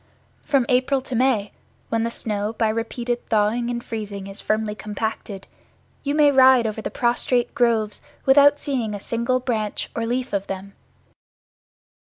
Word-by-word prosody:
From 270 -4 +1
April 260 +2 +2
to 260 - -7
May, 235 -5 +1 0.4
when 225 0 0
the 230 - 0
snow 210 -2 -3
by 225 -1 +1
repeated 235 +2 -2
thawing 225 +2 +1
and 240 0 -3
freezing 205 -3 -5
is 195 +1 -7
firmly 215 0 -1
compacted, 210 -2 -5 0.6
you 285 +1 -1
may 295 -1 +5
ride 260 -3 +6
over 220 0 -3
the - - -3
prostrate 240 0 0
groves 225 -3 +1 0.2
without 285 +2 +6
seeing 240 -7 -2
a - - -6
single 235 +4 -1
branch 225 -5 -2
or 230 0 -2
leaf 250 +1 -2
of 200 -1 -1
them. 195 +1 -6
230 Hz, 155 wpm, -23 LUFS, 215-255 Hz, 0.6 s, ride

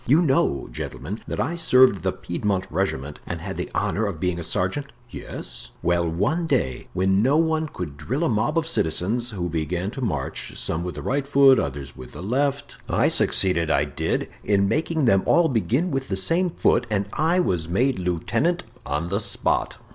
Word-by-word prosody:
You 150 +8 +5
know, 135 - +1
gentlemen, 95 - -6
that - - -4
I 165 +6 0
served 130 - +4
the 95 +1 0
Piedmont 95 +2 -2
regiment 75 -7 -2
and - - -4
had - - -5
the - - -4
honor 110 +1 0
of 90 -6 -5
being 90 0 -1
a - - -4
sergeant?" 95 - -1 0.2
"Yes." - - -7
"Well, 85 -1 +2
one 115 - 0
day 110 - -1
when 95 +2 +2
no 135 +6 +3
one 160 -1 +1
could 85 - -7
drill 130 - -2
a - - +2
mob 120 +7 0
of 165 - +2
citizens, 115 - 0
who 95 -6 -3
began 85 +4 -2
to 135 - -7
march, 75 - -3
some 80 +1 -2
with 90 - -5
the - - -6
right 140 +1 -1
foot, 140 -1 +6
others 70 -2 -4
with 65 0 -11
the - - -8
left, 140 +6 -1
I - - +3
succeeded, 85 -4 +3
I - - +3
did, - - -2 0.2
in 100 -1 +2
making 160 +4 0
them 95 -5 +4
all 170 -1 +5
begin 130 - 0
with 135 -1 -2
the 95 - -2
same 170 - +2
foot, 145 - +1
and 100 -2 0
I 165 +4 +2
was 85 - 0
made 125 +6 +1
lieutenant 90 - 0 0.2
on 75 +4 -2
the 100 +2 0
spot." 105 -2 0
105 Hz, 195 wpm, -24 LUFS, 85-140 Hz, 0.2 s, foot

